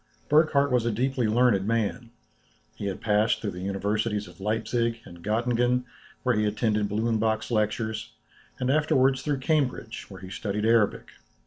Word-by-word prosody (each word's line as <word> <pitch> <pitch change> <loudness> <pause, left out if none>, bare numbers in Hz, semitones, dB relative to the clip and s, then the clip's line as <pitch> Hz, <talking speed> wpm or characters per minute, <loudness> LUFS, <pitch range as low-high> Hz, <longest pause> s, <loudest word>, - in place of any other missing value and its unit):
Burckhardt 150 -2 +4
was 125 -2 +3
a 115 - 0
deeply 125 +1 0
learned 110 -3 +3
man. 115 +1 -1 0.7
He 100 - -4
had 95 - -4
passed 105 0 +2
through 105 - -3
the 90 0 -8
universities 105 +2 -1
of 90 +1 -15
Leipzic, 115 +2 -1
and 85 -1 -13
Göttingen, 120 +3 +1 0.4
where 125 - +2
he 105 -1 +1
attended 105 -1 0
Blumenbach's 110 +1 0
lectures, 110 0 -1 0.5
and 130 0 +1
afterwards 135 -3 +3
through 145 -2 -2
Cambridge, 130 -6 -1
where 95 -2 -11
he 95 0 -9
studied 105 +2 -2
Arabic. 115 -2 +2
115 Hz, 150 wpm, -26 LUFS, 105-125 Hz, 0.7 s, Burckhardt